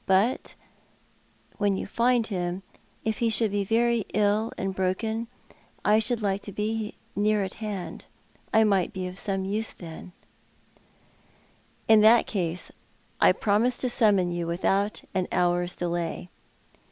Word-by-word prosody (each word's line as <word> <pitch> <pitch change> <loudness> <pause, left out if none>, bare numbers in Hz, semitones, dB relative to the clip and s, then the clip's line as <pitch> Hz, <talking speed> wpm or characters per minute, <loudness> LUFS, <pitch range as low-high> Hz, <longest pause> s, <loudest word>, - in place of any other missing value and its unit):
But 195 +6 +1 1.0
wheu 200 -2 +2
you - - -4
find 240 0 +2
him, 180 -2 -3 0.4
if 220 -1 -1
he 235 - +2
should 220 -1 +2
be 205 0 0
very 230 +2 +2
ill 210 +2 +2
and 195 - -2
broken, 220 +5 -1 0.6
I 210 +1 +5
should 230 0 -1
like 200 0 0
to 200 - -8
be 215 +1 -3 0.2
near 210 0 +2
at 190 - -5
hand. 205 -4 -5 0.4
I 220 - +5
might 200 -1 +2
be 185 -2 -4
of 180 +1 -8
some 195 -1 -1
use 210 +3 +1
then," 170 +1 -10 0.9
" - - -34
In 220 -1 +7
that 225 +2 +6
case 180 -4 -2 0.5
I - - +6
promise 225 +4 +1
to 255 - 0
summon 205 -7 +3
vou 175 -1 -3
without 195 +4 0
an 185 -1 0
hour's 175 0 +1
delay." 175 0 -3
205 Hz, 145 wpm, -26 LUFS, 185-220 Hz, 1.0 s, In